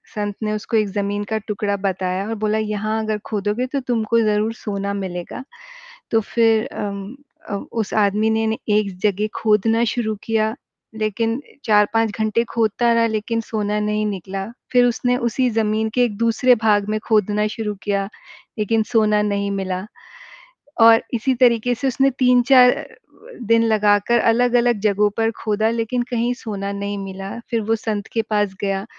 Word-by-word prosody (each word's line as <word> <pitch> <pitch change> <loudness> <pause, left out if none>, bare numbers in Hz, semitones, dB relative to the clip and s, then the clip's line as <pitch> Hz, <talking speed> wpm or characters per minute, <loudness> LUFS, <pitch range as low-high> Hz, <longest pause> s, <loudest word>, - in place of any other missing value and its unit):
संत 205 -1 -3
ने 215 0 -1
उसको 215 +1 -1
एक 215 -1 +2
ज़मीन 205 +1 -2
का 220 - +2
टुकड़ा 205 -1 -1
बताया 185 +2 -2
और 225 - -2
बोला 215 +1 +1
यहाँ 215 +1 -2
अगर 215 -1 -1
खोदोगे, 210 +3 -1
तो 275 +1 -2
तुमको 230 -2 0
ज़रूर 215 +1 +1
सोना 200 -2 -4
मिलेगा। 185 +3 -5 0.7
तो 225 - +4
फ़िर 225 0 +2
अम 200 +3 -5 0.3
अ, 200 - -2 0.2
उस 225 -3 -3
आदमी 210 +2 +1
ने 220 0 +1 0.2
एक 205 -3 +1
जगह 210 +1 +1
खोदना 225 +1 +2
शुरू 220 -3 -1
किया 220 0 0 0.4
लेकिन 225 +4 -1 0.2
4-5 220 +1 +3
घंटे 220 +2 +1
खोदता 230 +1 +1
रहा 230 0 +3
लेकिन 225 +1 -2
सोना 210 -1 -2
नहीं 210 0 0
निकला, 195 0 -4 0.3
फ़िर 245 -1 +5
उसने 245 +1 +1
उसी 245 +1 0
ज़मीन 220 0 0
के 250 - +4
एक 210 -4 -4
दूसरे 230 +2 +3
भाग 205 -2 +3
में 215 0 0
खोदना 210 -1 +2
शुरू 210 -1 -4
किया 200 -1 -1 0.5
लेकिन 220 +1 +1
सोना 215 -2 +3
नहीं 200 -1 -1
मिला 190 -1 -3 1.0
और 225 0 +7
इसी 260 +4 +1
तरीके 245 -1 +3
से 265 +3 -2
उसने 270 +2 +2
3-4 250 0 +6 0.7
दिन 230 0 +4
लगाकर 210 +1 +3
अलग-अलग 240 -1 +2
जगहों 210 0 +2
पर 225 0 +1
खोदा 215 0 +1
लेकिन 230 +2 -1
कहीं 240 0 0
सोना 200 -4 -5
नहीं 200 0 -4
मिला, 195 +2 -6
फिर 230 - +1
वो 225 +1 0
संत 215 -2 -4
के 225 - +1
पास 205 -3 -1
गया 195 0 -1
215 Hz, 160 wpm, -20 LUFS, 205-230 Hz, 1.0 s, और